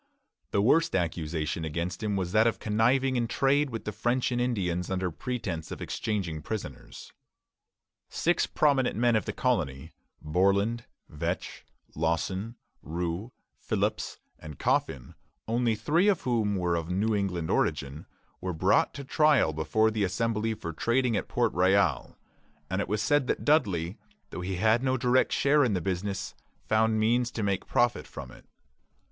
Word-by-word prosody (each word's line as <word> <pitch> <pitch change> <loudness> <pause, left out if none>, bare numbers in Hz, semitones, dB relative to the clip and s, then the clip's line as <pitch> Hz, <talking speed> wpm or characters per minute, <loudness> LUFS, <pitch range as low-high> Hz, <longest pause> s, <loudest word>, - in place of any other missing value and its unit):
The 100 - +1
worst 155 +8 +3
accusation 80 -2 -2
against 85 +4 -3
him 105 -2 -1
was 90 -2 -2
that 110 +3 +4
of 115 - 0
conniving 125 +5 +2
in 120 -1 0
trade 140 +4 +2
with 115 -2 -6
the 105 - -2
French 120 +5 0
and 120 0 0
Indians 90 -8 -1
under 95 -1 -1
pretence 95 -5 -4
of - - -6
exchanging 90 -8 -3
prisoners. 75 - -7 1.0
Six 175 +1 +1
prominent 140 -4 +2
men 120 +1 +3
of 110 - +1
the - - -2
colony 80 - -1 0.3
Borland, 100 +8 +1 0.2
Vetch, 75 - -4 0.3
Lawson, 95 +7 -1 0.3
Rous, 85 +6 -3 0.3
Phillips, - - -2 0.2
and 75 -3 -9
Coffin, 65 -3 -1 0.3
only 115 0 +1
three 155 - +2
of 200 -5 +3
whom 110 -5 0
were 90 -2 0
of 85 0 -3
New 105 +5 +1
England 90 -5 -1
origin 70 +3 -1 0.3
were 90 -1 -3
brought 95 +5 +2
to 140 - -6
trial 145 - +3
before 110 +9 +1
the 105 -1 -1
Assembly 110 +3 0
for 85 -5 -6
trading 120 +6 +1
at - - -2
Port 120 -2 0
Royal; 95 +2 +2 0.5
and - - 0
it - - -3
was 105 +2 -1
said 145 +3 +2
that - - -2
Dudley, 100 - +1 0.3
though - - -5
he 95 +1 -3
had 110 +5 +3
no 130 0 +1
direct 125 +1 +2
share 145 +1 +3
in 120 -5 +1
the - - +1
business, 95 +3 -3 0.3
found 110 0 +2
means 120 +2 +2
to 115 - -4
make 100 -2 -1
profit 120 0 +1
from - - -9
it. - - -16
105 Hz, 160 wpm, -28 LUFS, 90-120 Hz, 1.0 s, that